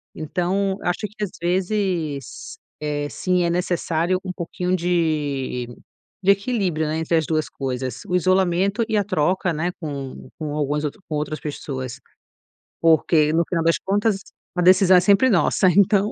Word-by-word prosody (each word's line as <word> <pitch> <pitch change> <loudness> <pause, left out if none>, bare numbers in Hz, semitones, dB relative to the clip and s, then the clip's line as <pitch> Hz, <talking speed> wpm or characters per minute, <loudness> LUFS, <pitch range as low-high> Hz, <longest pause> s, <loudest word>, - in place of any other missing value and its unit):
Então 185 +5 -1
acho 180 0 -1
que 210 +1 -7
às 195 - -3
vezes, 175 - -2 0.2
eh, 145 -1 -2
sim, 180 +2 0
é 170 - +1
necessário 175 0 0
um 185 - -4
pouquinho 180 +1 -2
de 150 -8 -1 0.6
de 195 - +6
equilíbrio, 200 -6 0
né, 155 - -1
entre 165 +1 +1
as 160 - +1
2 155 -1 -1
coisas: 130 -2 -4
o 180 - 0
isolamento 185 +4 +2
e 220 - -1
a 205 - +3
troca, 180 -1 0
né, 165 +3 -1
com 140 -4 -6
com 150 -2 -4
alguns 150 0 -1
outro 150 - -5
com 155 - -2
outras 150 +1 -3
pessoas. 130 -4 -5 0.8
Porque, 160 -1 +4
no 165 +1 +3
final 165 -2 -1
das 165 0 +3
contas, 205 +1 +1 0.4
a 180 - +2
decisão 185 +1 +6
é - - +7
sempre 200 +7 +4
nossa. 190 -2 +3
Então 200 +3 +3
175 Hz, 160 wpm, -22 LUFS, 150-190 Hz, 0.8 s, é